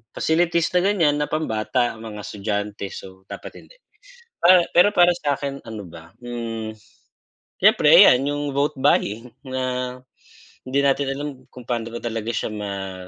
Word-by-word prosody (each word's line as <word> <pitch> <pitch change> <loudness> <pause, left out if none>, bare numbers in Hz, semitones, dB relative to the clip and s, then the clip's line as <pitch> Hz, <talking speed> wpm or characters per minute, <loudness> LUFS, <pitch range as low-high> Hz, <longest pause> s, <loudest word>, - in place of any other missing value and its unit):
facilities 170 +1 +1
na - - +6
ganiyan 170 -8 +2
na 150 - -1
pambata, 120 -4 -1
mga 110 -2 -8
estudyante, 105 0 -4
so 95 0 -11
dapat - - -9
hindi. - - -18 0.7
Pa 180 0 +7
pero 190 +4 +6
para 175 0 +5
sa 145 -4 0
akin 140 -1 -5
ano 110 -2 -7
ba, 85 0 -13
hmm, 115 -2 -5 0.9
siyempre - - +5
ayan 125 +1 +5
yung 145 0 -2
vote 145 +2 0
buying 115 -2 +1 0.2
na 125 -1 -3 0.7
hindi 135 +2 0
natin 140 0 +1
alam 145 +2 -4 0.2
kung 125 - -12
paano 115 -1 -3
ba 120 - -4
talaga 115 -1 -3
siya 110 - -2
ma 100 -3 -6
125 Hz, 150 wpm, -22 LUFS, 110-145 Hz, 0.9 s, Pa